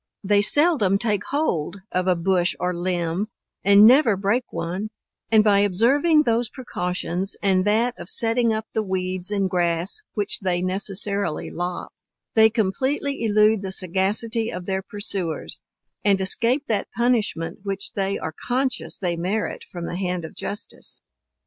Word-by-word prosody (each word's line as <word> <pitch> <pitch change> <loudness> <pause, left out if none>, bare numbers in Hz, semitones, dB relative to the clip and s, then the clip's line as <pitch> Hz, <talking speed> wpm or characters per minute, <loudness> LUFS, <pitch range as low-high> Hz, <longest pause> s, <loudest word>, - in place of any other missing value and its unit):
They 205 +1 +3
seldom 260 - +5
take 205 -2 -1
hold 200 - -2
of 185 0 -1
a 185 - +3
bush 175 0 +1
or 180 0 -1
limb, 175 +2 -2 0.4
and 200 +1 +7
never 240 -3 +5
break 210 +6 -1
one; 185 +6 -4 0.4
and 220 -1 +5
by 205 -2 +4
observing 265 - +3
those 235 -2 0
precautions 180 -5 -3
and 190 -1 +2
that 225 +4 +2
of - - -2
setting 230 0 +1
up 220 0 -2
the 220 - 0
weeds 185 -2 -3
and 200 -2 0
grass 175 - -1
which 205 -2 0
they 180 -2 -1
necessarily 200 -1 0
lop, 175 +1 -4 0.4
they 220 0 +6
completely 260 +7 -1
elude 215 -1 +3
the 190 -1 -5
sagacity 205 +5 +1
of 180 0 -6
their 190 0 -2
pursuers, 195 -4 -3 0.4
and 200 -2 +3
escape 230 +8 +2
that 215 -3 -1
punishment 210 -8 0
which 195 0 -3
they 195 -3 -2
are 160 - -5
conscious 255 +1 -1
they 175 -3 -1
merit 185 +6 -3
from 175 -1 -6
the 175 - -4
hand 180 -3 -2
of - - -10
justice. 205 - -5
200 Hz, 150 wpm, -23 LUFS, 185-225 Hz, 0.4 s, and